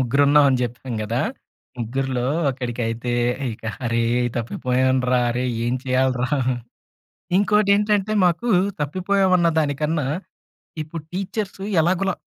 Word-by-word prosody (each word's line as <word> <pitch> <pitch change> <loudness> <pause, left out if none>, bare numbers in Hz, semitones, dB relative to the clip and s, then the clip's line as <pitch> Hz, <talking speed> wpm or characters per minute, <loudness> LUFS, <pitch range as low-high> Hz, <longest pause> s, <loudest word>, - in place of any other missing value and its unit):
ముగ్గురు 130 +3 +2
ఉన్నాం 145 +1 +6
అని 130 - +2
చెప్పాం 120 +1 -4
కదా! 115 +4 -1 0.6
ముగ్గురిలో 125 +1 -2 0.3
ఒకడికైతే, 120 -2 -3 0.4
ఇక 110 - -12 0.2
"అరే 115 0 +1 0.3
తప్పిపోయాను 130 +2 0
రా! 125 - +4
అరే 125 +2 -1 0.2
ఏం 120 +1 0
చేయాలి 130 0 +2
రా!" 130 - 0 1.1
ఇంకోటి 210 0 +3
ఏంటంటే, 210 0 +1
మాకు 180 +8 +1 0.3
తప్పిపోయాం 185 +6 +1
అన్న 170 -1 +3
దానికన్నా 150 0 0 0.8
ఇప్పుడు 155 +1 -7
టీచర్స్ 195 +1 -4 0.2
ఎలాగోలా 185 +3 +1
135 Hz, 115 wpm, -22 LUFS, 125-185 Hz, 1.1 s, ఉన్నాం